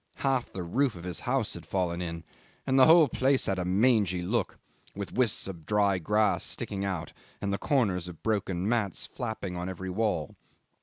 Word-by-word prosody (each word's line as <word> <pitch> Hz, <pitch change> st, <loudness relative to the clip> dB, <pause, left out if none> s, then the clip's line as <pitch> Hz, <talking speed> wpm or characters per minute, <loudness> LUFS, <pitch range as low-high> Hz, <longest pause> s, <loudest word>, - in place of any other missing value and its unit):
Half 130 Hz, -3 st, +1 dB
the 95 Hz, -, -4 dB
roof 125 Hz, +8 st, +1 dB
of 85 Hz, -, -9 dB
his 90 Hz, -3 st, -4 dB
house 125 Hz, -3 st, 0 dB
had 85 Hz, -, -7 dB
fallen 90 Hz, 0 st, -1 dB
in, 85 Hz, -1 st, -5 dB, 0.4 s
and 135 Hz, 0 st, +3 dB
the 130 Hz, -, +8 dB
whole 160 Hz, -1 st, +7 dB
place 130 Hz, +2 st, +2 dB
had 95 Hz, -2 st, 0 dB
a 90 Hz, -, -1 dB
mangy 100 Hz, -2 st, +2 dB
look, 105 Hz, +3 st, -1 dB, 0.4 s
with 100 Hz, -1 st, -6 dB
wisps 125 Hz, -6 st, +1 dB
of 85 Hz, -5 st, -7 dB
dry 100 Hz, -2 st, +2 dB
grass 105 Hz, +5 st, +2 dB
sticking 100 Hz, -1 st, -3 dB
out 95 Hz, -5 st, -3 dB, 0.3 s
and 100 Hz, -1 st, -2 dB
the 100 Hz, -, -2 dB
corners 100 Hz, -, +1 dB
of 90 Hz, -3 st, -11 dB
broken 95 Hz, -4 st, -1 dB
mats 110 Hz, -5 st, -1 dB
flapping 110 Hz, -7 st, -5 dB
on 90 Hz, +1 st, -3 dB
every 95 Hz, 0 st, -5 dB
wall. 90 Hz, -7 st, -1 dB
100 Hz, 190 wpm, -29 LUFS, 90-120 Hz, 0.4 s, the